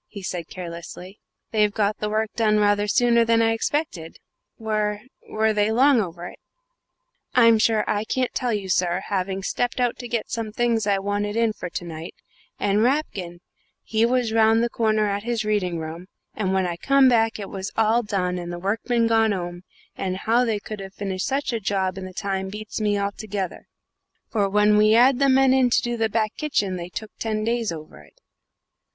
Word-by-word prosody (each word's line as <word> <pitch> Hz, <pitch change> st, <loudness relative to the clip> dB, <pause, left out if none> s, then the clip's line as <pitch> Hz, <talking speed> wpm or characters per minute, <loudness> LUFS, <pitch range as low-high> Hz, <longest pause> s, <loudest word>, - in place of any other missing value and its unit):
he 200 Hz, -2 st, -10 dB
said 175 Hz, -2 st, -4 dB
carelessly. 180 Hz, +2 st, -8 dB, 0.3 s
"They've 210 Hz, -2 st, +3 dB
got 210 Hz, 0 st, 0 dB
the 210 Hz, -, -2 dB
work 215 Hz, 0 st, -1 dB
done 215 Hz, -2 st, +2 dB
rather 205 Hz, 0 st, +2 dB
sooner 235 Hz, +2 st, +4 dB
than 230 Hz, 0 st, +3 dB
I 225 Hz, 0 st, +3 dB
expected. 225 Hz, -, -2 dB, 0.4 s
Were 210 Hz, -1 st, -1 dB, 0.3 s
were 220 Hz, 0 st, +1 dB
they 210 Hz, +1 st, +1 dB
long 260 Hz, +1 st, +4 dB
over 175 Hz, -2 st, -6 dB
it?" -, -, -10 dB, 1.0 s
"I'm 230 Hz, -3 st, +6 dB
sure 215 Hz, -1 st, +2 dB
I 210 Hz, 0 st, 0 dB
can't 255 Hz, +2 st, -1 dB
tell 250 Hz, -2 st, -1 dB
you, 205 Hz, -3 st, -2 dB
sir, 180 Hz, -1 st, +1 dB
having 195 Hz, 0 st, -2 dB
stepped 245 Hz, +5 st, -1 dB
out 245 Hz, -1 st, 0 dB
to 245 Hz, -, -6 dB
get 235 Hz, -2 st, -3 dB
some 225 Hz, -2 st, -3 dB
things 230 Hz, -1 st, 0 dB
I 200 Hz, -1 st, +3 dB
wanted 205 Hz, +1 st, -2 dB
in 230 Hz, -1 st, +2 dB
for -, -, -6 dB
to 175 Hz, -, -5 dB
night; 165 Hz, 0 st, -8 dB, 0.4 s
and 205 Hz, +1 st, +2 dB
Rapkin, 205 Hz, -, -1 dB, 0.4 s
he 220 Hz, 0 st, 0 dB
was 240 Hz, -1 st, +1 dB
round 225 Hz, 0 st, +4 dB
the 235 Hz, -, -1 dB
corner 215 Hz, -2 st, +1 dB
at 200 Hz, 0 st, -1 dB
his 230 Hz, -1 st, -2 dB
reading 195 Hz, -5 st, 0 dB
room; 165 Hz, +3 st, -7 dB, 0.3 s
and 195 Hz, -3 st, -2 dB
when 190 Hz, -1 st, +1 dB
I 175 Hz, -1 st, -3 dB
come 275 Hz, +7 st, +4 dB
back 225 Hz, -2 st, +3 dB
it 200 Hz, -2 st, -7 dB
was 190 Hz, -1 st, -5 dB
all 225 Hz, +2 st, +3 dB
done 180 Hz, -4 st, -2 dB
and 175 Hz, 0 st, -6 dB
the 175 Hz, -, -5 dB
workmen 225 Hz, +5 st, 0 dB
gone 225 Hz, -1 st, +3 dB
'ome; 175 Hz, -2 st, -5 dB, 0.3 s
and 185 Hz, -1 st, -3 dB
how 230 Hz, +5 st, +2 dB
they 225 Hz, -3 st, 0 dB
could 215 Hz, 0 st, -8 dB
have 195 Hz, 0 st, -9 dB
finished 190 Hz, -2 st, -3 dB
such 275 Hz, -2 st, -1 dB
a 230 Hz, -, -1 dB
job 190 Hz, -2 st, -1 dB
in 190 Hz, -, -6 dB
the 185 Hz, -, -8 dB
time 190 Hz, 0 st, -3 dB
beats 215 Hz, +2 st, -6 dB
me 205 Hz, -1 st, +1 dB
altogether, 200 Hz, -1 st, -4 dB, 0.6 s
for 205 Hz, -3 st, +1 dB
when 210 Hz, +1 st, +4 dB
we 215 Hz, +1 st, +5 dB
'ad 250 Hz, +2 st, +5 dB
the 275 Hz, -1 st, +4 dB
men 265 Hz, 0 st, +5 dB
in 260 Hz, -2 st, +4 dB
to -, -, +3 dB
do 240 Hz, 0 st, -2 dB
the 225 Hz, -1 st, 0 dB
back 215 Hz, 0 st, -1 dB
kitchen 210 Hz, -11 st, -1 dB
they 175 Hz, -1 st, -6 dB
took 215 Hz, +4 st, -7 dB
ten 215 Hz, -1 st, -2 dB
days 230 Hz, -2 st, 0 dB
over 155 Hz, -, -9 dB
it." 75 Hz, -, -22 dB
210 Hz, 200 wpm, -23 LUFS, 190-230 Hz, 1.0 s, I'm